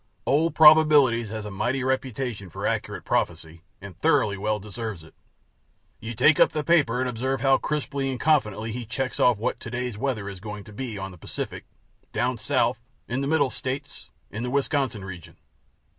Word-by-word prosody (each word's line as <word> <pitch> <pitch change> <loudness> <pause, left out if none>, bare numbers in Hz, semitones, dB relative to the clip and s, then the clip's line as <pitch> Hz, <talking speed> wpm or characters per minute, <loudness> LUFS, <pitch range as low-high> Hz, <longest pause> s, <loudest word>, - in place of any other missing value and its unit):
Old 160 +4 +2
Probabilities 150 -7 +6
has 110 0 -5
a 105 - -6
mighty 125 +7 -1
reputation 125 -6 -2
for - - -6
accurate - - -2
prophecy, 80 +1 -2 0.2
and 100 -3 -10
thoroughly 145 -10 +3
well 105 +2 -1
deserves 105 -3 -6
it. 80 - -16 0.9
You 115 +1 -6
take 150 +7 +5
up - - +5
the 150 - -1
paper 145 -8 +3
and 130 - 0
observe 125 +2 -2
how 135 -1 +4
crisply 140 -2 -2
and 130 -2 -3
confidently 115 -8 +1
he 120 +2 -4
checks 120 +4 -3
off 125 -3 +4
what 110 - -2
to - - -8
day's 125 -3 -4
weather 110 -7 -2
is 100 -2 -7
going 105 0 -7
to 105 - -13
be 115 -1 -5
on 95 0 -5
the 90 - -14
Pacific, - - -6 0.5
down - - 0
South, - - +1 0.3
in 125 +3 -2
the 140 - -1
Middle 145 -3 +2
States, 135 +2 -6 0.2
in 105 - -5
the 125 - -2
Wisconsin 135 -6 -1
region. 90 -4 -10
125 Hz, 185 wpm, -25 LUFS, 105-135 Hz, 0.9 s, Probabilities